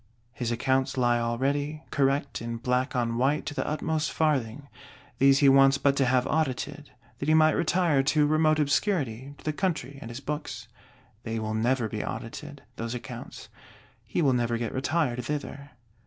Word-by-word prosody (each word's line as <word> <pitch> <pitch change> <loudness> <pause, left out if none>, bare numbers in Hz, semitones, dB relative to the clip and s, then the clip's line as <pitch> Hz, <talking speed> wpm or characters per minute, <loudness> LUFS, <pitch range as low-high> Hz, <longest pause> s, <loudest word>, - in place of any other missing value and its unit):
His 120 -2 -3
accounts 130 +3 0
lie 120 -1 +3
all 115 0 -1
ready, 145 +4 -1
correct 140 -1 0
in 115 0 -4
black 125 +3 -1
on 120 -1 0
white 140 +4 +1
to 145 - -4
the - - -3
utmost 155 0 -1
farthing: 140 -4 0 0.5
these 135 0 +6
he - - +8
wants 135 0 +6
but 140 -1 +2
to 135 - +3
have 125 0 +2
audited, 150 -1 -2 0.3
that 140 - -3
he 155 - +5
might 155 0 +6
retire 170 -4 +2
to 150 +2 +2
remote 155 +1 +3
obscurity, 140 - 0
to - - -18
the 155 - 0
country 155 -5 -2
and 115 - -7
his 120 +2 -6
books. 140 -6 -5 0.5
They 115 -1 -4
will 110 0 -3
never 120 +2 +1
be 110 0 -4
audited, 145 +5 -7
those 115 +1 -4
accounts: 120 - -8 0.5
he 170 - -1
will 135 -3 +4
never 120 -1 0
get 115 -1 -3
retired 130 -2 0
thither. 145 +1 -5
135 Hz, 175 wpm, -27 LUFS, 120-150 Hz, 0.5 s, he